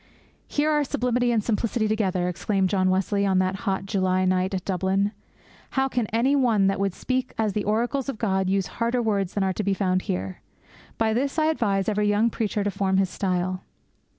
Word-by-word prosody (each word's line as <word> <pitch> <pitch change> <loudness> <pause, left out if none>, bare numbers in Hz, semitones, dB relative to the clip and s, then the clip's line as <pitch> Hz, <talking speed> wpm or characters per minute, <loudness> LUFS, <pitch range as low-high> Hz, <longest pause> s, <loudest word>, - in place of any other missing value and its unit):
'Here 300 +1 +1
are 295 -1 +2
sublimity 245 -3 0
and 225 -3 +1
simplicity 225 0 0
together!' 190 -5 0
exclaimed 190 +2 0
John 185 -1 +2
Wesley 195 +2 +1
on 190 -2 +2
that 185 0 +1
hot 190 0 -1
July 185 -2 +1
night 185 +1 +1
at 185 - -4
Dublin. 195 +2 0 0.6
'How 265 0 +1
can 245 -4 -1
any 240 +7 +2
one 230 -7 +3
that 195 0 +1
would 195 -2 -1
speak 255 0 -2
as 215 -3 0
the 210 0 -2
oracles 240 +6 0
of 270 - -4
God 190 -4 0
use 195 -1 +1 0.2
harder 235 +2 +1
words 200 -5 -1
than 200 - +1
are 190 -1 +1
to 210 - -3
be 200 0 +1
found 185 -1 +1
here? 95 - -4 0.6
By 220 -1 +1
this 275 +6 -1
I 310 - +3
advise 200 -9 0
every 210 -1 +1
young 210 +3 +2
preacher 210 -2 -1
to 205 - -1
form 190 -1 0
his 190 -1 +1
style!' 185 -1 -1
200 Hz, 205 wpm, -25 LUFS, 190-230 Hz, 0.6 s, one